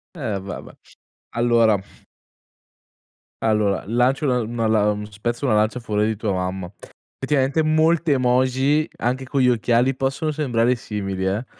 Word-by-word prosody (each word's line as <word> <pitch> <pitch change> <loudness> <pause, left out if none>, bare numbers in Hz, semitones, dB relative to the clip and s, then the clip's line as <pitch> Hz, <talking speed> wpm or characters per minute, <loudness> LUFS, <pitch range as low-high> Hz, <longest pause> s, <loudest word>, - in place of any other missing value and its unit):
Eh, 110 - -3
va, 95 - -7
va. - - -14 0.6
Allora 115 -3 +3 1.6
allora 105 -3 +1
lancio 125 +6 +1
una 125 -3 +1
una 115 0 -2
lan 105 -1 +1
spezzo 120 +6 -3
una 110 - +2
lancia 110 +3 +1
a - - -13
favore 105 -2 0
di 110 - -1
tua 105 -3 -1
mamma. 90 0 -3 0.5
Effettivamente 140 +2 +1
molte 155 0 +2
emoji 130 +4 +2
anche 130 +2 -2
con 135 +1 -2
gli 125 - +4
occhiali 120 +2 +2
possono 135 +4 -1
sembrare 125 -5 +1
simili 100 -5 -4
eh, 100 +6 -1
120 Hz, 145 wpm, -22 LUFS, 105-135 Hz, 1.6 s, gli